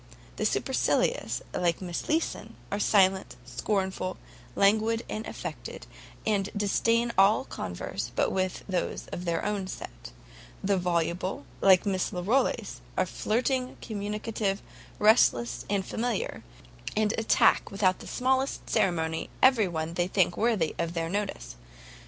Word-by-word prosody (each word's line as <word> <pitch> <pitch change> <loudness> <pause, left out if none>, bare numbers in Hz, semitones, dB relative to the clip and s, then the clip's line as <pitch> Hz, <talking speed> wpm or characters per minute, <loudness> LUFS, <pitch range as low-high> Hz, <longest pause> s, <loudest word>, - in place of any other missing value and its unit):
The - - +2
SUPERCILIOUS, - - 0
like 170 -2 +1
Miss 175 -3 -5
Leeson, 320 +2 -1 0.2
are 200 - -1
silent, 190 - +3
scornful, 185 - -2 0.4
languid, 220 +3 +3
and 215 +1 -4
affected, - - -7 0.4
and 205 -2 +1
disdain 230 +3 +2
all 205 +6 +5
converse - - -5
but - - +2
with 185 -1 -1
those 185 -3 -2
of 180 - -5
their 170 -1 -1
own 205 -2 -1
set: - - -8 0.5
the 200 0 +2
VOLUBLE, 175 -1 -1 0.2
like 190 -2 +6
Miss 190 -2 0
Larolles, 200 +10 0 0.2
are - - +3
flirting, 255 +3 -1
communicative, 210 -1 -3 0.3
restless, 210 - +4
and 200 -2 0
familiar, 245 - -2 0.5
and 215 0 +2
attack 225 - +4
without 190 -2 +1
the - - -10
smallest 260 +2 0
ceremony, 160 -3 +1
every 255 -6 +6
one 160 -1 -3
they 175 +1 0
think 185 -2 +2
worthy 215 -8 +1
their 165 0 -1
notice. 195 - -3
195 Hz, 125 wpm, -28 LUFS, 175-220 Hz, 0.5 s, like